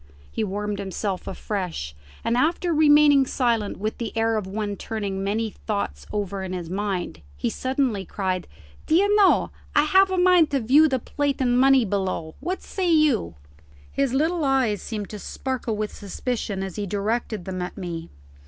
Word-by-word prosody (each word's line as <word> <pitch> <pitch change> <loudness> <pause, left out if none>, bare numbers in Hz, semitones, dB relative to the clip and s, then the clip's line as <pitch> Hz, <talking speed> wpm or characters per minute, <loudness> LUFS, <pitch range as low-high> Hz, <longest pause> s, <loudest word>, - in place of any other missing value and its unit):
He 225 - -2
warmed 205 0 -3
himself 195 -1 -3
afresh, 180 - -4 0.3
and 230 - +1
after 330 +6 +1
remaining 295 -3 +6
silent 230 -5 0
with 215 +3 -3
the 230 -1 -4
air 225 0 +2
of 210 -3 -2
one 205 +1 -3
turning 200 -3 -4
many 215 +2 -1
thoughts 200 - -4
over 200 -2 -3
in 185 -1 -4
his 175 -2 -5
mind, 185 - -3 0.2
he 115 - -1
suddenly 255 -6 -1
cried, 185 -2 -3 0.4
"D'ye 345 +6 +4
know 410 -2 +4 0.2
I 295 - +6
have 380 +6 +5
a 375 - -1
mind 360 -3 +5
to 280 - +1
view 275 +7 +5
the 265 -3 +1
plate 285 +3 -2
and 245 -2 +2
money 265 -1 +5
below. 185 -5 -2
What 360 +6 -3
say 365 -3 -1
you?" 295 - +3 0.6
His 275 -2 0
little 320 +5 +1
eyes 260 -7 +2
seemed 210 -3 -5
to 210 - -6
sparkle 245 -1 -3
with 210 0 -3
suspicion 205 -1 -3
as 190 -3 -6
he 205 -1 -2
directed 210 0 -2
them 185 -1 -4
at 180 - -5
me. 170 -3 -5
220 Hz, 170 wpm, -24 LUFS, 195-275 Hz, 0.6 s, remaining